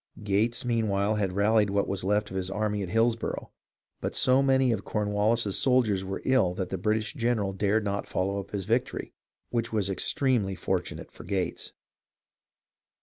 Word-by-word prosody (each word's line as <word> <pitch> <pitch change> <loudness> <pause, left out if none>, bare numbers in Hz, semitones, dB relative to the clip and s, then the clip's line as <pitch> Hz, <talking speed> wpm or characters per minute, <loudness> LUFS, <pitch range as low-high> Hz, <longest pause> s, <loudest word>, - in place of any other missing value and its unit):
Gates, 105 +5 +1
meanwhile, 110 -3 +1
had 95 -3 -1
rallied 105 +1 +3
what 100 0 +1
was 95 -1 -3
left 105 +1 0
of - - -6
his 95 -1 -2
army 105 +1 -1
at 95 - -4
Hillsborough; 115 +2 0 0.5
but - - -4
so 130 +1 +4
many 135 -2 +3
of 105 -3 -1
Cornwallis's 105 0 0
soldiers 120 -7 +2
were 95 0 -5
ill 130 -9 +3
that 95 -1 -3
the 95 - -2
British 110 - 0
general 115 -7 0
dared 105 +3 +1
not 100 0 -2
follow 100 +2 -1
up 100 - -7
his 100 -3 -4
victory 120 +5 -1 0.2
— - - -57
which 120 -1 -1
was 105 -3 0
extremely 110 -1 +1
fortunate - - -3
for - - -12
Gates. 95 -2 -3
105 Hz, 170 wpm, -28 LUFS, 100-115 Hz, 0.5 s, so